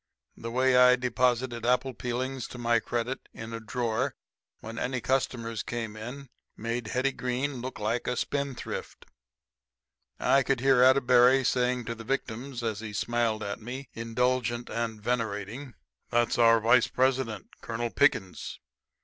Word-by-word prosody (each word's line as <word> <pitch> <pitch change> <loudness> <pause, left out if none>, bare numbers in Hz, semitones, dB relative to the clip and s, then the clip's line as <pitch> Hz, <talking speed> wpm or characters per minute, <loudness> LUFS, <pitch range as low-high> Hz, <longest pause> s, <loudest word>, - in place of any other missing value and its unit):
The 115 - -6
way 130 +2 +3
I 125 0 +7
deposited 125 -1 0
apple 125 +2 +2
peelings 125 +1 -3
to - - -9
my 120 -1 +2
credit 120 +3 -3
in 115 +1 -7
a 115 - -4
drawer 115 0 -1 0.4
when 115 +1 -7
any 125 0 -1
customers 115 -3 -1
came 115 -3 -4
in 125 +6 -7 0.3
made 115 +1 -3
Hetty 130 +4 +1
Green 125 +1 -2
look 130 +1 -5
like 110 +3 -1
a 125 - -1
spendthrift. 140 -3 -4 1.1
I 135 - +4
could 135 -1 0
hear 135 -1 +4
Atterbury 130 0 +6
saying 125 -1 +1
to 115 - -3
victims, 120 +1 -4
as 110 -3 -2
he 110 -1 -7
smiled 115 0 0
at 100 +2 -4
me, 125 +4 -7
indulgent 120 +1 -1
and 115 -2 -2
venerating, 115 +2 -3 0.3
"That's 120 0 +1
our 115 -1 +6
vice 115 +2 +4
president, 130 -5 0
Colonel 115 0 -3
Pickens 105 -10 +1
120 Hz, 140 wpm, -28 LUFS, 115-130 Hz, 1.1 s, I